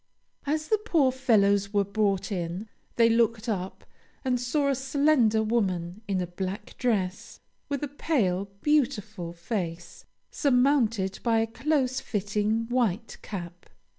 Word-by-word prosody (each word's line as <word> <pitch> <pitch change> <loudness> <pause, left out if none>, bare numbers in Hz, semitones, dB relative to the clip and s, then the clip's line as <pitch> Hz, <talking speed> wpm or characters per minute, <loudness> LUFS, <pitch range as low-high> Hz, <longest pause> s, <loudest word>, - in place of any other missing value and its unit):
As 305 +1 -1
the 435 - +3
poor 330 -11 +2
fellows 205 -6 +2
were 200 -1 +3
brought 200 -1 0
in, 180 +2 -3 0.3
they 230 -1 +5
looked 230 -1 +2
up, 190 -4 -3 0.4
and 250 -2 +1
saw 280 +4 +1
a - - +3
slender 265 -4 +2
woman 195 -4 -1
in 195 -2 0
a 180 - -1
black 185 +3 -5
dress, 200 -7 -1 0.3
with 285 0 -2
a - - 0
pale, 230 - 0 0.2
beautiful 220 - 0
face 175 -1 -5 0.3
surmounted 250 - +2
by 230 -2 +2
a 225 - +3
close 260 +2 0
fitting 215 -1 -1
white 230 -3 -1
cap. 175 -3 -7
220 Hz, 135 wpm, -27 LUFS, 195-260 Hz, 0.4 s, they